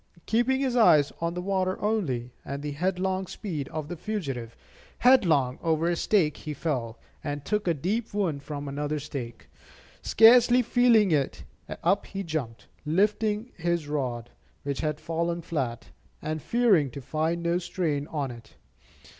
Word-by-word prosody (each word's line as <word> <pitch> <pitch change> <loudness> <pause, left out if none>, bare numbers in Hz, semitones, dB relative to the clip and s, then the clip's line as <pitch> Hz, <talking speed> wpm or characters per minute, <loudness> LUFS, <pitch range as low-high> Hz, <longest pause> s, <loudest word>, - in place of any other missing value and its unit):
Keeping 245 +4 +2
his 260 -3 0
eyes 155 - +5
on 170 +1 -1
the 180 - -4
water 190 -1 0
only, 135 - -1
and 140 +1 -5
the 150 - -3
headlong 185 +4 -1
speed 160 -10 -5
of 155 -2 -5
the 175 - -5
fugitive, 140 - -4 0.4
headlong 165 - +4
over 165 0 +1
a 175 - +1
stake 170 -4 +2
he 150 -1 -6
fell, 120 -9 -2 0.3
and 145 -2 -4
took 210 -2 -1
a 170 - +2
deep 210 - -2
wound 185 -9 -1
from 145 0 -6
another 145 +2 -2
stake. 135 -5 -7 0.5
Scarcely 240 +2 +6
feeling 235 -4 +4
it, 145 -4 0 0.4
up - - +2
he 195 0 -5
jumped, 150 -10 -4 0.2
lifting 210 - +1
his 170 -3 -1
rod, 125 -5 -3 0.3
which 140 -1 -3
had 150 -1 -2
fallen 170 +1 -2
flat, 130 -8 -3 0.3
and 155 0 -4
fearing 210 - +3
to 135 - -8
find 160 +5 -2
no 170 +1 +1
strain 165 -5 -2
on 145 -5 -3
it. 115 -2 -13
165 Hz, 155 wpm, -27 LUFS, 145-195 Hz, 0.5 s, Scarcely